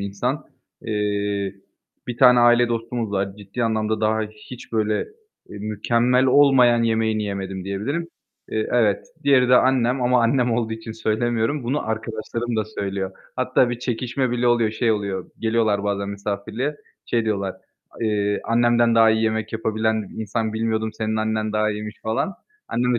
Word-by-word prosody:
insan. 120 Hz, +9 st, -2 dB, 0.4 s
Eee, 105 Hz, -2 st, -1 dB, 0.5 s
bir 120 Hz, -, -4 dB
tane 125 Hz, -2 st, +7 dB
aile 120 Hz, 0 st, +5 dB
dostumuz 115 Hz, -1 st, -2 dB
var. 95 Hz, 0 st, -2 dB
Ciddi 105 Hz, +4 st, -4 dB
anlamda 110 Hz, -1 st, 0 dB
daha 110 Hz, 0 st, +1 dB
hiç 110 Hz, +3 st, -10 dB
böyle, 110 Hz, -1 st, +1 dB, 0.5 s
eee, 105 Hz, -, -9 dB
mükemmel 115 Hz, +5 st, +1 dB
olmayan 125 Hz, -3 st, +5 dB
yemeğini 110 Hz, -1 st, +1 dB
yemedim, 95 Hz, -2 st, -4 dB
diyebilirim. 115 Hz, -, -3 dB, 0.4 s
Eee, 110 Hz, 0 st, -1 dB
evet. 110 Hz, -5 st, +2 dB, 0.2 s
Diğeri 130 Hz, -4 st, +4 dB
de 125 Hz, -, +7 dB
annem. 130 Hz, 0 st, +2 dB
Ama 125 Hz, 0 st, +3 dB
annem 125 Hz, +1 st, +2 dB
olduğu 115 Hz, -1 st, -1 dB
için 110 Hz, 0 st, -6 dB
söylemiyorum. 115 Hz, +4 st, 0 dB
Bunu 135 Hz, +5 st, 0 dB
arkadaşlarım 110 Hz, +1 st, -3 dB
da 110 Hz, -, +1 dB
söylüyor. 100 Hz, -3 st, -4 dB, 0.3 s
Hatta 130 Hz, -1 st, +2 dB
bir 120 Hz, -, -3 dB
çekişme 125 Hz, +1 st, -2 dB
bile 120 Hz, 0 st, 0 dB
oluyor. 120 Hz, -2 st, +3 dB
Şey 115 Hz, +1 st, 0 dB
oluyor; 100 Hz, -3 st, -3 dB
geliyorlar 110 Hz, -3 st, +1 dB
bazen 100 Hz, -1 st, -1 dB
misafirliğe, 105 Hz, +8 st, -3 dB, 0.3 s
şey 115 Hz, -1 st, 0 dB
diyorlar; 100 Hz, -3 st, -1 dB, 0.5 s
eee, 105 Hz, -2 st, 0 dB
"Annemden 120 Hz, 0 st, +3 dB
daha 115 Hz, -1 st, +6 dB
iyi 110 Hz, 0 st, +1 dB
yemek 110 Hz, 0 st, -1 dB
yapabilen 110 Hz, -1 st, -1 dB
insan 110 Hz, +1 st, -2 dB
bilmiyordum, 110 Hz, 0 st, -1 dB
senin 110 Hz, 0 st, -2 dB
annen 110 Hz, 0 st, -1 dB
daha 110 Hz, 0 st, +1 dB
iyiymiş." 105 Hz, 0 st, -6 dB
falan. 110 Hz, -, -1 dB, 0.3 s
Annem 125 Hz, +1 st, +1 dB
de -, -, +1 dB
110 Hz, 155 wpm, -22 LUFS, 105-120 Hz, 0.5 s, tane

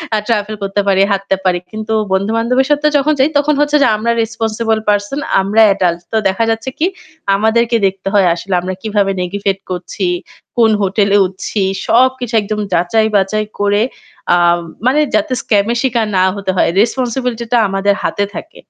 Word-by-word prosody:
আ -, -, +2 dB
travel 215 Hz, -2 st, -1 dB
করতে 195 Hz, +1 st, 0 dB
পারি, 195 Hz, 0 st, +3 dB
হাঁটতে 195 Hz, 0 st, 0 dB
পারি। 180 Hz, -1 st, +2 dB
কিন্তু 220 Hz, 0 st, -4 dB, 0.2 s
বন্ধুবান্ধবের 230 Hz, +7 st, +1 dB
সাথে 295 Hz, +1 st, +2 dB
যখন 300 Hz, +2 st, +2 dB
যাই 270 Hz, +4 st, +4 dB
তখন 295 Hz, +1 st, +2 dB
হচ্ছে 295 Hz, 0 st, +2 dB
যে, -, -, +4 dB
আমরা 230 Hz, +2 st, -1 dB
রেসপনসিবল 225 Hz, 0 st, -1 dB
পারসন, 205 Hz, +7 st, 0 dB, 0.2 s
আমরা 205 Hz, +3 st, +2 dB
এডাল্ট। 175 Hz, -3 st, -1 dB
তো 220 Hz, -, +1 dB
দেখা 195 Hz, +4 st, 0 dB
যাচ্ছে 225 Hz, +3 st, -2 dB
কি 325 Hz, -, +2 dB, 0.5 s
আমাদেরকে 230 Hz, +3 st, +1 dB
দেখতে 195 Hz, 0 st, -6 dB
হয় 195 Hz, -3 st, +4 dB
আসলে 185 Hz, +2 st, -5 dB
আমরা 185 Hz, +1 st, -4 dB
কিভাবে 205 Hz, -2 st, 0 dB
নেগিভেট 195 Hz, +1 st, -2 dB
করছি, 180 Hz, +1 st, -3 dB, 0.5 s
কোন 225 Hz, -2 st, +4 dB
হোটেলে 200 Hz, +1 st, +2 dB
উঠছি 190 Hz, +3 st, -4 dB, 0.3 s
সবকিছু 250 Hz, 0 st, +2 dB
একদম 210 Hz, +1 st, -4 dB
যাচাই 200 Hz, +6 st, +2 dB
বাচাই 210 Hz, +2 st, +1 dB
করে 205 Hz, +1 st, +2 dB, 0.5 s
আ -, -, +5 dB, 0.5 s
মানে 270 Hz, +4 st, +3 dB, 0.2 s
যাতে 310 Hz, -4 st, 0 dB
স্কাম 205 Hz, -2 st, +1 dB
এ -, -, -3 dB
শিকার 235 Hz, -4 st, 0 dB
না 185 Hz, -, +4 dB
হতে 195 Hz, -1 st, -2 dB
হয়। -, -, +3 dB
রেসপনসিবিলিটি 245 Hz, 0 st, -1 dB
টা 240 Hz, -, +5 dB
আমাদের 195 Hz, +1 st, +1 dB
হাতে 205 Hz, -, -1 dB
থাকে। 330 Hz, -, -9 dB
215 Hz, 170 wpm, -15 LUFS, 195-235 Hz, 0.5 s, আ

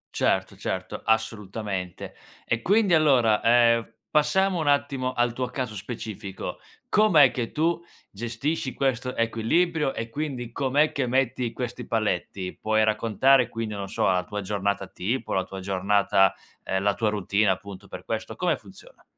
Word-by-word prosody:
Certo, -, -, +1 dB
certo -, -, -4 dB
assolutamente 105 Hz, -4 st, -2 dB, 0.3 s
e 115 Hz, 0 st, -1 dB
quindi 200 Hz, -, +3 dB
allora, 130 Hz, -9 st, +4 dB
ehm, 115 Hz, -1 st, +4 dB, 0.2 s
passiamo 185 Hz, +4 st, +2 dB
un 155 Hz, -, -2 dB
attimo 140 Hz, -3 st, +1 dB
al 120 Hz, -1 st, +1 dB
tuo 125 Hz, 0 st, -2 dB
caso 125 Hz, -3 st, -4 dB
specifico, 105 Hz, -1 st, -6 dB, 0.3 s
com'è 165 Hz, -, +5 dB
che 120 Hz, -3 st, -3 dB
tu 170 Hz, +2 st, 0 dB, 0.3 s
gestisci 120 Hz, +6 st, -3 dB
questo 130 Hz, -2 st, -1 dB
equilibrio 135 Hz, +7 st, +1 dB
e 115 Hz, 0 st, -4 dB
quindi 130 Hz, -4 st, -4 dB
com'è 140 Hz, +4 st, +2 dB
che 135 Hz, -3 st, -1 dB
metti 125 Hz, -1 st, 0 dB
questi 125 Hz, -1 st, -5 dB
paletti? 95 Hz, -4 st, -2 dB
Puoi 110 Hz, 0 st, +2 dB
raccontare 115 Hz, +4 st, +3 dB
quindi, 115 Hz, -2 st, -4 dB
non 100 Hz, -1 st, -5 dB
so, -, -, -2 dB
la 90 Hz, -1 st, +2 dB
tua 105 Hz, +2 st, -5 dB
giornata 100 Hz, 0 st, -1 dB
tipo, 115 Hz, +10 st, -3 dB
la 95 Hz, -, 0 dB
tua 95 Hz, -, -8 dB
giornata 95 Hz, 0 st, +2 dB, 0.3 s
ehm, 95 Hz, +1 st, -2 dB
la 100 Hz, 0 st, +3 dB
tua 110 Hz, -2 st, 0 dB
routine 105 Hz, 0 st, +1 dB
appunto 100 Hz, +1 st, -4 dB
per -, -, -9 dB
questo, 110 Hz, 0 st, -4 dB
come 180 Hz, -2 st, +1 dB
funziona? -, -, -16 dB
115 Hz, 150 wpm, -25 LUFS, 105-135 Hz, 0.3 s, com'è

